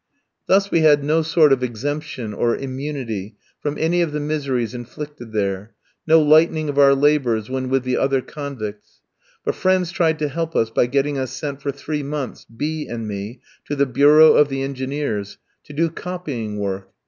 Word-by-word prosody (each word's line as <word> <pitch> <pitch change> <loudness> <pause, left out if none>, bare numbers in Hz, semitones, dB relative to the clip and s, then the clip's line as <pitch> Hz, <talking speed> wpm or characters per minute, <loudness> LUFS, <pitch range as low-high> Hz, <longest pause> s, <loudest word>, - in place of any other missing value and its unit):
Thus 195 +1 +3
we 165 - +3
had 150 -2 +5
no 155 +3 +2
sort 155 -2 +4
of 130 - 0
exemption 125 -1 -4
or 115 +3 +1
immunity 130 -7 -5 0.2
from 145 0 -3
any 170 +2 +1
of 165 -3 -1
the 150 - -1
miseries 140 -6 -2
inflicted 125 +1 -8
there, 100 0 -2 0.3
no 160 +1 +7
lightening 155 0 +4
of 145 0 -1
our 140 -1 +7
labours 135 -6 +1
when 130 -1 -2
with 135 -1 +1
the 130 0 0
other 135 0 +2
convicts; 125 -8 -7 0.4
but - - +1
friends 185 -2 +1
tried 165 -4 +1
to 150 - -1
help 165 +3 -4
us 115 0 +1
by 120 - +2
getting 140 +2 0
us 130 -1 -2
sent 140 +1 -5
for 140 - -2
three 150 +2 -4
months, 140 -1 -5
B 150 +7 -4
ski - - -14
and 115 -2 -4
me, 105 +4 -6 0.2
to 145 - -3
the 140 0 +3
bureau 145 +5 +6
of 150 - +4
the 135 0 -2
Engineers, 135 -6 -3 0.3
to - - -12
do 165 +3 +1
copying 155 -11 -5
work. 95 -1 -4
140 Hz, 185 wpm, -21 LUFS, 120-150 Hz, 0.4 s, no